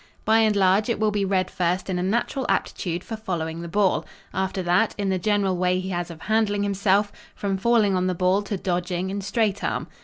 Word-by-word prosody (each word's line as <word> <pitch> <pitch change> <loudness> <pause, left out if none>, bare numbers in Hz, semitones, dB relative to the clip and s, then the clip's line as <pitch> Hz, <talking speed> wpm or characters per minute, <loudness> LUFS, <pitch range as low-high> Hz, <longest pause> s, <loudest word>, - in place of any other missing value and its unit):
By 220 +1 +4
and 215 -2 +3
large, 195 +3 +3
it 235 - 0
will 215 -1 +2
be 205 -1 0
read 190 -1 0
first 180 +1 -1
in 185 -2 -1
a - - -1
natural 235 +6 -1
aptitude 175 0 -1
for 225 - -5
following 170 -6 -4
the 170 - -6
ball. 195 +2 +2 0.3
After 190 0 -2
that, 180 +5 +2
in 200 -2 -1
the 190 -1 0
general 200 -1 +1
way 180 0 +1
he 185 +1 -4
has 175 -1 -3
of 165 -2 -10
handling 215 -2 +1
himself, 200 +1 +2 0.2
from 200 -1 -2
falling 210 -1 +3
on 185 0 +1
the 185 - 0
ball 185 +3 +2
to 205 0 -4
dodging 180 0 -2
and 200 0 -4
straight 205 0 0
arm. - - -1
190 Hz, 220 wpm, -24 LUFS, 180-205 Hz, 0.3 s, By